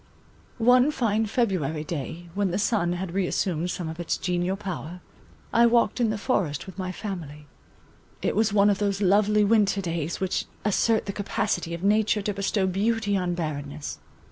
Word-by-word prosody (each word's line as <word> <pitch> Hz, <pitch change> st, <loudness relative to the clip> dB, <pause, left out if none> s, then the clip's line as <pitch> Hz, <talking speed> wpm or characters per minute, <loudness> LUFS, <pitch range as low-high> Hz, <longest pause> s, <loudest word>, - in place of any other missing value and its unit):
One 250 Hz, +3 st, +5 dB
fine 225 Hz, -6 st, 0 dB
February 185 Hz, -, 0 dB
day, 165 Hz, +2 st, -5 dB
when 200 Hz, 0 st, 0 dB
the 180 Hz, -, -1 dB
sun 200 Hz, -4 st, +1 dB
had 180 Hz, 0 st, -4 dB
reassumed 180 Hz, -2 st, 0 dB
some 175 Hz, -2 st, -3 dB
of 160 Hz, +1 st, -6 dB
its 175 Hz, -, -1 dB
genial 180 Hz, +1 st, -1 dB
power, 180 Hz, -3 st, -6 dB, 0.5 s
I 235 Hz, +1 st, +6 dB
walked 235 Hz, -1 st, +2 dB
in 235 Hz, -2 st, +2 dB
the 215 Hz, -, -1 dB
forest 190 Hz, -, -1 dB
with 190 Hz, 0 st, -10 dB
my 185 Hz, -1 st, -2 dB
family. 165 Hz, -7 st, -6 dB, 0.8 s
It -, -, 0 dB
was 215 Hz, 0 st, +2 dB
one 205 Hz, 0 st, +5 dB
of 195 Hz, -, -1 dB
those 200 Hz, -1 st, 0 dB
lovely 210 Hz, +2 st, +4 dB
winter 205 Hz, -2 st, +3 dB
days 170 Hz, -3 st, -3 dB
which 190 Hz, -1 st, -1 dB, 0.2 s
assert 220 Hz, +2 st, +2 dB
the 200 Hz, -, -4 dB
capacity 200 Hz, -4 st, -2 dB
of 170 Hz, -, -9 dB
nature 210 Hz, 0 st, +2 dB
to 205 Hz, -, -1 dB
bestow 200 Hz, 0 st, 0 dB
beauty 205 Hz, +2 st, 0 dB
on 180 Hz, -2 st, 0 dB
barrenness. 150 Hz, -3 st, -5 dB
195 Hz, 170 wpm, -26 LUFS, 175-210 Hz, 0.8 s, I